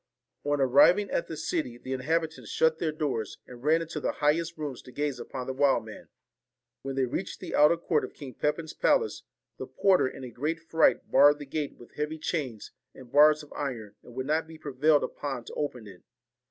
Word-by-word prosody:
On 145 0 0
arriving 145 +10 +5
at 170 - -1
the 160 - -6
city, 155 -6 -2
the 130 +2 -5
inhabitants 160 +5 -2
shut 160 0 +2
their 160 -2 0
doors, 145 -8 -3
and 125 -1 -12
ran 160 +3 +3
into 165 -1 -5
the - - -1
highest 160 +3 0
rooms 145 -5 -5
to 130 - -14
gaze 145 -2 -2
upon 130 0 -6
the 130 - -3
wild 135 -4 +2
man. 110 - -11 0.7
When 135 0 -5
they 135 -1 +2
reached 180 +9 -4
the - - -7
outer 150 +3 +5
court 160 -2 0
of - - -7
King 135 -3 -9
Pepin's 150 +5 -2
palace, 460 -3 +1 0.4
the - - -5
porter 190 -8 +3
in 130 - -8
a 125 - -7
great 150 +8 -2
fright 165 0 +2
barred 145 0 +7
the 145 - -8
gate 145 +1 -3
with 120 - -15
heavy 150 +1 -2
chains 140 - -4 0.2
and 125 -2 -13
bars 150 +1 +6
of 150 - -14
iron, 115 -7 -4
and 120 - -15
would 130 0 -3
not 155 +3 0
be 160 0 -11
prevailed 145 +1 +2
upon 135 -4 -4
to - - -9
open 130 -6 -3
it. 95 -3 -13
145 Hz, 205 wpm, -28 LUFS, 130-160 Hz, 0.7 s, barred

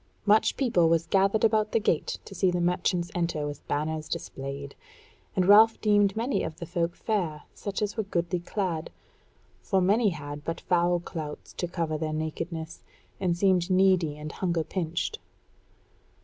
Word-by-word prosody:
Much 215 +1 +4
people 185 -11 +3
was 165 0 +2
gathered 195 +5 +2
about 215 -1 +2
the - - +4
gate 175 -7 0
to - - -10
see 190 -1 +2
the 180 0 0
merchants 175 0 0
enter 170 -4 -1
with 145 -1 -7
banners 155 +1 -2
displayed; 140 +1 -5 0.6
and 185 - +2
Ralph 220 +2 +7
deemed 205 -1 +3
many 240 +4 0
of 160 0 -5
the 170 - -6
folk 170 +1 -1
fair, 175 -9 -2
such 200 +1 -4
as 210 +2 -3
were - - +2
goodly 175 -3 -1
clad; 175 -2 -3 0.7
for 195 - +1
many 205 +4 +3
had 145 -3 -6
but 165 +1 -4
foul 175 0 +2
clouts 155 -3 -7
to 175 - -3
cover 165 -3 -2
their 155 -1 -2
nakedness, 160 +1 -4 0.4
and 180 -3 0
seemed 185 -1 +2
needy 185 -5 +3
and 150 0 -6
hunger 170 -2 -1
pinched. 175 - -3
175 Hz, 165 wpm, -27 LUFS, 160-195 Hz, 0.7 s, Ralph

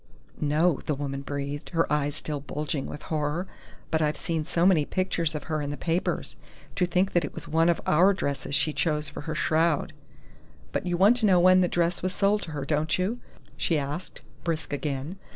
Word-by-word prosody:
"No," 150 +2 +2
the 150 - 0
woman 140 0 -4
breathed, 140 +1 -4
her 165 - +4
eyes 145 0 0
still 150 -1 -3
bulging 145 0 -3
with 150 - -8
horror. 155 +3 -1 0.5
"But 160 - +2
I've 150 0 +1
seen 160 -2 -2
so 170 +3 +1
many 180 -6 +5
pictures 170 -2 -1
of 150 - -4
her 155 -2 -2
in 145 - -3
the 145 - -4
papers.... 170 +2 -1 0.4
To 180 - +2
think 185 +3 +1
that 175 - +3
it 145 - -5
was - - -6
one 165 +2 +3
of 170 - +2
our 180 +6 +5
dresses 140 -6 -2
she 155 - +2
chose 150 -2 0
for - - -7
her 155 +1 -4
shroud! 160 0 +1 0.8
But 180 - -2
you 175 -1 0
want 205 +7 +6
to 225 -3 +3
know 185 -2 +5
when 185 +1 +6
the 180 - +3
dress 175 0 0
was 185 +1 -2
sold 205 +1 +2
to 160 - -6
her, 145 -2 -3
don't 155 +2 +1
you?" 200 +7 -1 0.4
she 165 - +1
asked, 145 +5 -4 0.2
brisk 160 -3 -2
again. 145 +4 -3
160 Hz, 205 wpm, -27 LUFS, 145-180 Hz, 0.8 s, want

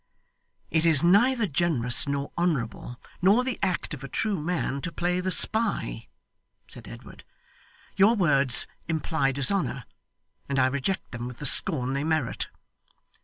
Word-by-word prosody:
'It 160 -1 +2
is 160 -4 +4
neither 225 +7 +4
generous, 140 - 0
nor 140 0 -2
honourable, 135 -7 -2 0.2
nor 200 +7 +4
the 255 -2 -3
act 185 -4 -1
of 135 -2 -8
a - - -5
true 205 - -1
man 155 -4 -2
to 180 - -4
play 180 +1 -1
the 185 +1 -2
spy,' 205 - 0 0.6
said - - -12
Edward. - - -12 0.7
'Your 205 +4 +5
words 140 - +3 0.2
imply 160 -3 0
dishonour, 140 -1 -1 0.7
and 140 - -1
I 130 - +4
reject 140 +8 -2
them 120 0 -5
with 125 -1 -8
the 150 - -7
scorn 135 -2 +1
they 140 +1 -1
merit. 155 -5 -1
160 Hz, 145 wpm, -26 LUFS, 135-185 Hz, 0.7 s, Your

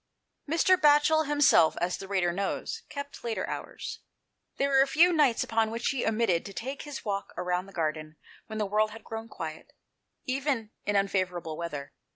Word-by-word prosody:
Mr. 335 +4 +4
Batchel 300 +1 +5
himself, 290 - +5
as 180 +1 -1
the 195 - -8
reader 185 -3 +1
knows, 200 - -3
kept 285 -1 -7
later 230 -2 -2
hours. - - -6 0.6
There 275 - +1
were 270 0 +5
few 340 +5 +5
nights 290 -7 +3
upon 225 -1 +1
which 230 +1 -1
he 265 -4 -1
omitted 215 -6 +2
to 200 - -9
take 265 +7 -5
his 295 -4 -7
walk 200 -1 -2
round 180 +1 -1
the - - -13
garden 155 -2 -3 0.3
when 220 - -6
the 215 - 0
world 215 +2 +2
had 225 +1 -11
grown 225 0 -6
quiet, 160 -5 -7 0.5
even 260 -4 -1 0.2
in 205 - +1
unfavourable 185 -5 0
weather. 150 -4 -5
220 Hz, 175 wpm, -28 LUFS, 180-275 Hz, 0.6 s, Batchel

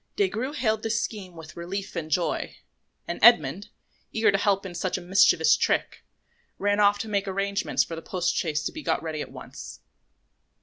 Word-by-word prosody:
Des 400 -2 +2
Grieux 255 +6 -3
hailed 220 -5 0
this 225 +1 0
scheme 190 -7 -5
with 160 -1 -11
relief 190 +4 -5
and 160 -2 -4
joy; 170 +2 -1 0.5
and 170 - -4
Edmond, 190 - +5 0.4
eager 220 -1 +3
to 195 - +2
help 200 -2 +1
in 185 - -6
such 180 +2 -2
a - - -5
mischievous 175 -3 +4
trick, - - -1 0.5
ran 205 +1 +1
off 205 0 +5
to 225 - -5
make 200 -1 -1
arrangements 195 -8 0
for 165 - -7
the 165 - -7
post 180 0 -1
chaise 150 -3 -1
to - - -2
be 315 - -8
got 220 - -1
ready 155 -2 -4
at - - -7
once. 60 -1 -10
195 Hz, 190 wpm, -26 LUFS, 165-210 Hz, 0.5 s, Edmond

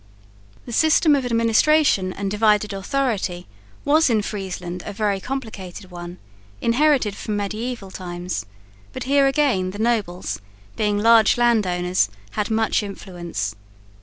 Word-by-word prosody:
The 240 - -8
system 315 +2 +4
of 265 -3 -1
administration 230 -2 +3
and 195 +1 -4
divided 210 -1 +2
authority 195 -4 -2 0.4
was 310 +1 +4
in 220 -3 +2
Friesland 185 -3 -5
a - - -6
very 205 -1 -1
complicated 200 -7 -6
one, 175 0 -8 0.4
inherited 250 -4 +2
from 210 0 -3
mediaeval 210 0 -4
times, 175 - -5 0.5
but - - -5
here 275 +1 +3
again 270 -10 +1
the 195 - -7
nobles, 210 - -1 0.3
being 210 -1 0
large 225 +1 +5
land 235 -4 +3
owners, 180 - +1 0.2
had 210 0 -2
much 220 0 +1
influence. 175 - -5
210 Hz, 130 wpm, -22 LUFS, 185-240 Hz, 0.5 s, large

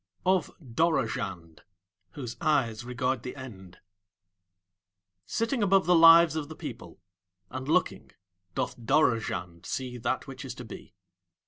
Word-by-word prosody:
OF 185 0 +2 0.2
DOROZHAND 110 - -1 0.5
(Whose 125 -5 -6
Eyes 125 -8 +1
Regard 125 0 -1
The 125 - -7
End) 95 -9 -10 1.5
Sitting 230 +2 -1
above 195 -1 +4
the 180 - +4
lives 165 0 +8
of 155 -2 -3
the 160 - -8
people, - - -9 0.5
and 130 +1 -5
looking, 155 - 0 0.5
doth - - -2
Dorozhand 110 - 0
see 125 -2 -4
that 120 +1 -1
which - - -9
is - - -7
to - - -9
be. - - -11
130 Hz, 125 wpm, -28 LUFS, 115-165 Hz, 1.5 s, lives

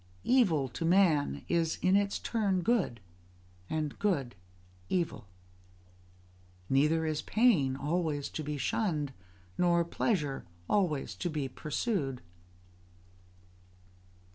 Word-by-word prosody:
Evil 185 - +3
to 165 - -5
man 165 - +3
is 165 -2 +1
in 185 +1 +4
its 200 0 +2
turn 200 -5 0
good, 190 - +1 0.7
and 155 -2 -2
good 150 -12 0 0.6
evil. 170 - -1 1.4
Neither 150 +4 +3
is 155 -1 -1
pain 190 - +3
always 150 0 -1
to 155 - -5
be 150 0 -3
shunned, 150 - -1 0.5
nor 170 -1 +3
pleasure 155 - -1 0.2
always 175 -9 +1
to 175 - -2
be 150 -4 -2
pursued. 145 - -2
160 Hz, 100 wpm, -31 LUFS, 145-190 Hz, 1.4 s, in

